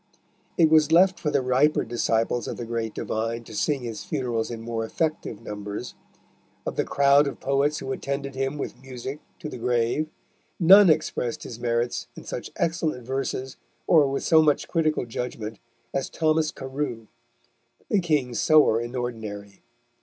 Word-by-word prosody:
It 160 -2 +5
was 155 -1 +5
left 185 +2 +5
for 150 - -1
the 135 - +1
riper 130 +4 +3
disciples 115 0 0
of - - -4
the 120 - -5
great 115 -1 -3
divine 115 +1 -2
to 110 - -12
sing 140 +4 0
his 115 -3 -5
funerals 115 -3 -2
in 115 -2 -5
more 115 0 -3
effective 155 -3 -2
numbers. 105 +3 -6 0.7
Of - - -3
the - - 0
crowd 140 +1 +4
of 140 - -5
poets 140 +2 +1
who 135 - -5
attended 140 +1 -3
him 135 +2 -2
with 140 - -6
music 130 +2 -7 0.2
to - - -7
the 140 - -7
grave, 120 +6 0 0.5
none 190 +2 +8
expressed 150 -6 0
his 115 - -8
merits 120 0 -1
in - - -10
such - - -6
excellent 160 -7 -1
verses 130 0 -3 0.3
or 155 -4 +5
with 135 - -2
so 160 -1 +6
much 150 -2 +2
critical 155 -5 0
judgment 115 -2 -5 0.3
as 135 - -1
Thomas 155 -1 +1
Carew, 130 -4 -4 0.8
the 205 - +2
king's 145 -9 0
sewer 150 -8 +5
in 120 +2 -6
ordinary. 110 -5 -5
130 Hz, 160 wpm, -25 LUFS, 115-150 Hz, 0.8 s, none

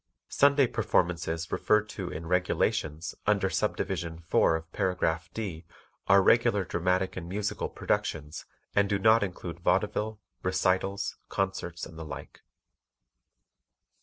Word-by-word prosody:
Sunday 140 0 +5
performances 85 -6 0
referred 105 0 +2
to 95 -4 -5
in 80 -1 -6
"Regulations" 80 -3 0
under - - +2
Subdivision 85 -1 -1
4 80 0 +2
of 80 +2 -7
Paragraph 90 -4 0
D 95 -7 -4 0.4
are 100 0 +6
regular 115 -3 +4
dramatic 90 +2 0
and 85 -2 -6
musical 105 +2 -2
productions 75 -1 -2 0.3
and 100 -1 +3
do 100 - +2
not 110 +3 +5
include 95 -3 -4
vaudeville, 110 0 0 0.2
recitals, 95 +1 0
concerts 95 -3 -2
and 80 - -11
the - - -5
like. 75 - -9
90 Hz, 120 wpm, -29 LUFS, 80-100 Hz, 0.4 s, are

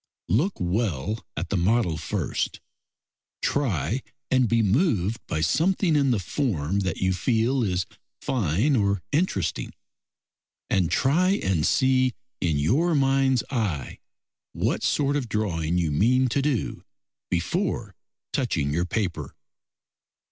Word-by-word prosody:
Look 150 - +2
well 90 - -1
at - - -3
the 100 - 0
model 90 -1 +2
first; 80 - -2 0.8
try 125 - 0 0.3
and 130 -3 +3
be 115 -1 +3
moved 110 - +1
by 80 - -2
something 165 - +2
in 140 -2 +3
the 120 - +2
form 95 - -1
that 95 -1 -2
you 95 0 +1
feel 120 +7 +1
is 90 -4 0 0.3
fine 115 - +1
or 100 -4 +1
interesting, 120 - -1 1.0
and 90 -4 +2
try 175 +8 +3
and 90 -5 +1
see 130 -1 +3 0.3
in 80 -4 +1
your 150 - +2
mind's 135 -2 +3
eye 100 - -2 0.5
what - - -1
sort 140 0 +1
of 130 -5 -2
drawing 90 -6 -1
you 85 -4 +1
mean 125 - +3
to 140 - +1
do 135 -7 -1 0.5
before 110 - -1 0.4
touching 70 +1 0
your 85 +3 +1
paper. 90 - -3
110 Hz, 125 wpm, -25 LUFS, 90-135 Hz, 1.0 s, and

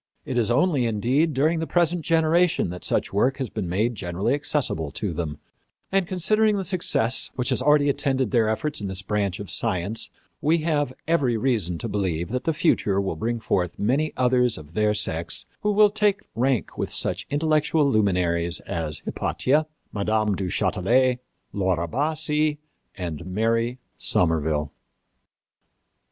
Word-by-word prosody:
It 130 - -4
is 115 -3 +2
only, 140 -1 +2
indeed, 125 +9 +1
during 155 +5 +2
the 160 - -3
present 175 0 +1
generation 165 - +2
that 90 - -8
such - - -1
work 125 +7 +2
has 130 -5 -4
been 100 -6 -4
made 110 +7 0
generally 95 +1 -2
accessible 140 - 0
to 100 0 -3
them; 80 -2 -4 0.5
and, 195 -2 +1
considering 210 +4 +2
the 195 - -3
success 145 -9 +2
which 125 -1 0
has - - +1
already 145 +1 +4
attended 135 -5 0
their 115 -2 +3
efforts 150 +5 -1
in 100 - -3
this 95 0 -2
branch 100 -2 -1
of 100 -4 -7
science, 100 +6 -1 0.3
we 160 +3 +3
have 145 -5 0 0.2
every 140 -8 +2
reason 105 -9 0
to 115 - -4
believe 90 -6 -2
that 125 +2 -3
the 165 - +2
future 105 - +1
will 95 -4 -2
bring 115 +7 -2
forth 90 -5 -1
many 140 +9 0
others 125 -2 +2
of 75 +1 -12
their 105 +1 +1
sex 85 -4 0 0.2
who 210 - +1
will 210 0 +5
take 210 -2 +1
rank 125 +2 0
with - - -2
such - - +1
intellectual 150 0 +2
luminaries 90 - +1
as 80 -3 -3
Hypatia, 150 +4 0 0.3
Mme. 110 0 0
du 95 -1 -3
Châtelet, 115 +7 +1 0.3
Laura 95 -4 0
Bassi 150 - 0 0.4
and 85 -4 -5
Mary 115 +5 0 0.2
Somerville. 80 -3 +2
120 Hz, 155 wpm, -24 LUFS, 95-150 Hz, 0.5 s, will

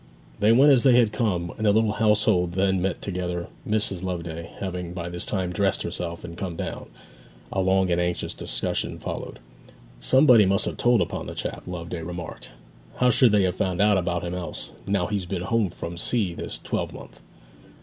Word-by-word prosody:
They 105 +2 +4
went 135 +5 +7
as 130 -3 +5
they 130 -1 +5
had 120 -3 +4
come; 95 -7 -1
and 110 -1 0
the - - +6
little 110 0 +3
household 105 -5 +2
then 95 0 +1
met 95 -1 -2
together, 90 -2 -3 0.2
Mrs. 105 -4 0
Loveday 85 -3 -5
having 90 -2 -4
by 85 -1 -5
this 85 0 -6
time 95 -3 -1
dressed 95 +1 +1
herself 85 0 -4
and 85 - -8
come 90 -1 -4
down. - - -5 0.7
A 95 - +1
long 95 -1 +2
and 85 0 +2
anxious 90 0 -2
discussion - - -2
followed. - - -6 0.6
'Somebody 125 -7 +6
must 95 +1 +2
have - - -4
told 120 -1 +3
upon - - -3
the - - -7
chap,' - - -5
Loveday 85 -1 -5
remarked. 85 +1 -7 0.5
'How 125 0 +3
should 125 -2 +5
they 105 -2 +4
have 90 -1 0
found 90 -2 -1
him 100 -4 +3
out 85 0 -2
else, 90 -1 -4 0.2
now 100 -3 +1
he's 100 -3 -2
been 90 -1 -3
home 110 0 +1
from 85 0 -7
sea 100 -3 0
this - - -5
twelvemonth?' - - -5
95 Hz, 185 wpm, -25 LUFS, 85-105 Hz, 0.7 s, went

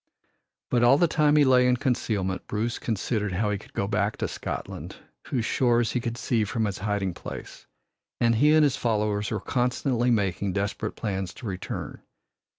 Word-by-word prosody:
But 120 - +3
all 120 +3 +6
the 175 - +4
time 150 -1 +3
he 150 -1 +6
lay 125 -1 +5
in 125 0 +3
concealment 105 -7 -1
Bruce 110 +3 -2
considered 105 -2 -1
how 105 +3 0
he 100 - -2
could - - -17
go 100 - -1
back 105 0 0
to - - -1
Scotland, - - -6 0.3
whose 120 -5 -1
shores 120 -3 +2
he 125 - 0
could 115 0 -4
see 115 -1 +1
from 110 +2 -1
his 100 -2 -3
hiding 100 -2 -1
place, - - -9 0.5
and 115 -1 +3
he 145 +7 +4
and 155 - +6
his 140 -3 +2
followers 105 -3 0
were - - -2
constantly 125 0 0
making 100 -4 0
desperate 100 +2 -2
plans 95 -4 -3
to - - -10
return. 95 -3 -5
110 Hz, 180 wpm, -26 LUFS, 100-125 Hz, 0.5 s, all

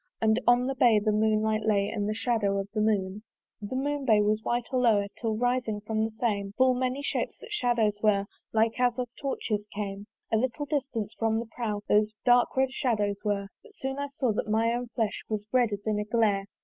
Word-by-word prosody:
And 220 +1 +2
on 245 +1 +5
the 270 - -1
bay 240 -4 +4
the 210 +1 +1
moon 215 0 +2
light 220 0 +1
lay, 205 -2 +2
And 205 -2 -2
the 215 - -1
shadow 220 -4 0
of 195 0 -2
the 215 - 0
moon. 205 -2 0 0.4
The 210 +5 -5
moonlight 280 +1 -2
bay 215 -2 +5
was 215 +1 +1
white 240 0 -1
all 250 -1 +3
o'er, 205 -3 +3
Till 220 -2 -2
rising 245 -3 0
from 215 +1 -1
the 220 - 0
same, 200 -4 -1
Full 260 +2 +4
many 255 +2 -1
shapes, - - -2
that - - -12
shadows 235 - +1
were, 200 -2 +3 0.3
Like 225 +2 +1
as 245 -1 +2
of 250 -1 -2
torches 215 -6 -3
came. 200 0 -5 0.3
A - - +5
little 260 +5 -1
distance 260 -7 -2
from 225 -1 0
the 230 - -2
prow 220 -3 -4
Those 210 +1 +3
dark 245 +1 +4
red 265 0 +2
shadows 210 -7 -1
were; 200 -2 -1
But 445 -3 -19
soon 270 +1 -4
I 285 - -2
saw 275 -3 -1
that 215 - -3
my 225 +2 +2
own 245 +1 -3
flesh 225 -2 -2
Was 210 -1 -2
red 245 -3 +3
as 205 0 -5
in 215 -1 0
a 210 - -2
glare. 210 -3 +1
220 Hz, 225 wpm, -28 LUFS, 210-245 Hz, 0.4 s, on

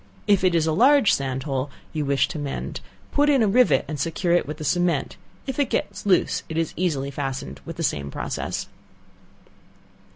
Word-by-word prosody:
If 200 -3 +3
it 180 -2 +3
is 160 -2 +3
a 160 - +1
large 250 - +5
sand 135 -1 -1
hole 135 -1 -2 0.2
you 150 -2 -1
wish 140 0 +2
to 155 - -5
mend, 145 -2 -4 0.3
put 290 +1 +3
in 275 -5 +4
a - - +3
rivet 245 +5 +4
and 150 -2 -5
secure 165 +4 0
it 175 - +2
with 150 +1 -5
the 155 - -6
cement, 175 -1 0 0.3
if 265 0 -4
it 285 - +2
gets - - -2
loose 185 -3 +3
it 160 - -4
is 165 -1 -1
easily 145 -6 -1
fastened 135 - -5
by - - -4
the - - -5
same 70 -1 -1
process. - - -3
160 Hz, 195 wpm, -24 LUFS, 140-195 Hz, 0.3 s, large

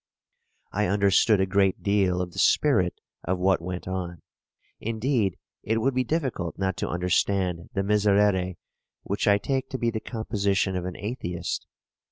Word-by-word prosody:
I 105 0 0
understood 100 +2 +4
a 95 - +3
great 95 0 +1
deal 95 -3 +2
of 90 - -7
the - - -5
spirit 95 -13 +3 0.2
of 95 +2 -1
what 95 -1 +2
went 90 +1 -5
on. 90 -2 -4 0.6
Indeed 115 - 0 0.2
it 110 +2 0
would 130 +4 +1
be 130 0 +1
difficult 125 - -2
not 95 -1 -1
to - - -2
understand 90 0 0
the 95 - +1
Miserere, 100 -3 +2 0.5
which 100 - -2
I 100 -1 +6
take 135 +5 -2
to 130 - -3
be 120 -2 0
the 110 - -3
composition 100 -4 -1
of 90 -1 -2
an 90 -1 -5
atheist. 90 -5 -4
100 Hz, 160 wpm, -26 LUFS, 90-110 Hz, 0.6 s, I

